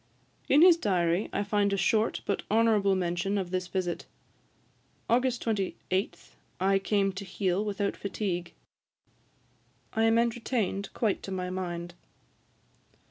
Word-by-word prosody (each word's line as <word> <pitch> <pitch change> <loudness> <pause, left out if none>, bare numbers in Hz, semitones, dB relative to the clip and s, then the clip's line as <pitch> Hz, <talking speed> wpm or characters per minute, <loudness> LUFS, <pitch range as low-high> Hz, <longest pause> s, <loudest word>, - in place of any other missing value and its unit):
In 290 +4 +6
his 350 -2 +8
diary 180 - +1
I - - -1
find 205 0 +1
a 200 - +1
short 215 +4 +1
but 200 - -1
honourable 215 -3 +3
mention 180 +2 -1
of 185 -3 -3
this 185 -1 -2
visit: 180 -1 -3 1.0
'August 245 +1 +1
28, 195 -3 -2 0.4
I 195 +1 +3
came 195 0 +1
to 190 +2 -6
Heale 190 0 -1
without 200 -1 -2
fatigue. 185 -3 -4 1.4
30. 225 - 0
I - - +4
am 225 0 +4
entertained 230 -4 -1
quite 215 -4 0
to 195 - -7
my 180 -1 -3
mind.' 175 -2 -4
195 Hz, 135 wpm, -29 LUFS, 185-215 Hz, 1.4 s, his